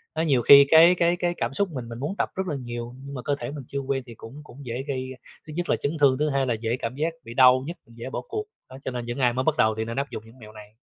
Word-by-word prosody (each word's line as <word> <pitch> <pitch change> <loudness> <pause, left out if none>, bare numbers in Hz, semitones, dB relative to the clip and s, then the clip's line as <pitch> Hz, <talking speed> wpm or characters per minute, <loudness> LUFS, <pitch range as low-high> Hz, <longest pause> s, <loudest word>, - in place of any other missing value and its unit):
Đó, 160 - 0
nhiều 140 -6 +2
khi 140 +3 +9
cái 165 +3 +7
cái 170 0 +2
cái 175 0 -1
cảm - - -2
xúc 200 +5 +1
mình, 125 -5 -6
mình 115 +1 -7
muốn 155 +9 -3
tập - - 0
rất 190 - -1
là 155 - -2
nhiều, 120 -1 -6
nhưng 140 - -8
mà 125 - -5
cơ 145 +3 -1
thể - - -5
mình 145 -3 -7
chưa 140 - -3
quen 135 -1 -2
thì 115 -3 -11
cũng 120 +7 -11
cũng 140 -1 -13
dễ 120 +2 -4
gây, 130 -2 -3 0.4
thứ 155 - -8
nhất 175 0 -3
là - - +4
chấn 150 +3 -3
thương, 135 -2 +4
thứ 150 +1 +1
hai 135 -1 0
là 120 - +1
dễ 115 +2 -2
cảm 120 +2 -4
giác 160 +3 -1
bị 115 - -9
đau 130 +1 +6
nhức, 170 - -6
dễ 115 +2 -9
bỏ - - -4
cuộc. 425 0 -3 0.3
Đó, 130 - -10
cho - - -2
nên 120 -1 -5
những 120 +3 -5
ai 125 -2 +3
mới 130 +2 -1
bắt 155 +1 +1
đầu 110 0 +3
thì 110 0 -3
nên 115 +2 -6
áp 140 0 -1
dụng 110 - -6
những 115 +3 -17
mẹo 110 -2 -12
này. 105 0 -14
130 Hz, 325 wpm, -25 LUFS, 120-150 Hz, 0.4 s, khi